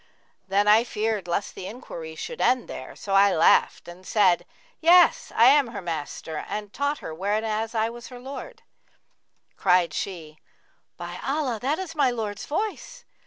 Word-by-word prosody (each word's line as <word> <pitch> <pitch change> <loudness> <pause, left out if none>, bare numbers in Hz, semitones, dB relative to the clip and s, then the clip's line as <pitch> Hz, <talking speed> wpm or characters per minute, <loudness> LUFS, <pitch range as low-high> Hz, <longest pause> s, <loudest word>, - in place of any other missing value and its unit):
Then 200 +2 +2
I 215 +2 +6
feared 215 -5 -2
lest 175 +4 -2
the 185 - -7
enquiry 170 -8 -8
should 485 - -6
end 255 -1 +2
there; 130 - -8
so 195 - -5
I 195 -1 +5
laughed 160 - +3
and 175 +2 -11
said, 185 -3 +2 0.3
'Yes; 345 +1 +5
I 230 - +6
am 280 +1 +6
her 230 -3 -6
master 160 -1 -5
and 210 -1 -5
taught 285 +1 -1
her 160 - -5
whenas 215 +5 -2
I 220 +1 +1
was 240 0 -10
her 250 -1 -10
lord.' 280 - -9 0.9
Cried 180 -4 +3
she, 160 -5 -6 0.6
'By 175 0 -7
Allah, 270 -4 -1
that 280 +5 0
is 370 -3 -6
my 290 -5 +3
lord's 215 -4 -4
voice!' 435 +8 -4
215 Hz, 165 wpm, -25 LUFS, 185-265 Hz, 0.9 s, I